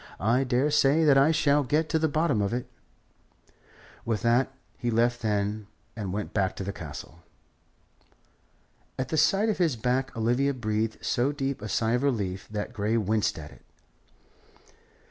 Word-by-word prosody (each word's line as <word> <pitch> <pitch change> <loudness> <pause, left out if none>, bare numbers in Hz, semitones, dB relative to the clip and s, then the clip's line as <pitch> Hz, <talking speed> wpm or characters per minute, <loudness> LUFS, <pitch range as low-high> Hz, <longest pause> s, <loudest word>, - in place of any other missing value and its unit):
"I 120 +6 +2
daresay 140 +4 +3
that 145 -3 +5
I 140 +3 +5
shall 150 -2 +3
get 150 +4 0
to 160 - +1
the 160 - +2
bottom 150 -6 +1
of 100 +2 -1
it." 125 - -4 1.4
With 115 -1 -2
that 120 +3 +2 0.2
he 120 - -3
left 120 +1 +1
them 105 -1 -1 0.3
and 105 -5 -4
went 105 +2 -4
back 95 -3 +1
into - - -6
the 100 +1 -4
Castle. 85 - -9 1.8
At 130 -1 -3
the - - -1
sight 195 +7 +3
of 210 - -1
his 165 -7 +2
back 125 +2 -1
Olivia 125 +5 +1
breathed 110 -2 -2
so 125 +4 +1
deep 140 -3 -3
a 105 - -5
sigh 110 +2 0
of 125 +1 +1
relief 100 -9 -1
that 105 +2 -4
Grey 110 +1 0
winced 110 0 0
at 75 -2 -9
it. - - -18
120 Hz, 165 wpm, -27 LUFS, 105-140 Hz, 1.8 s, that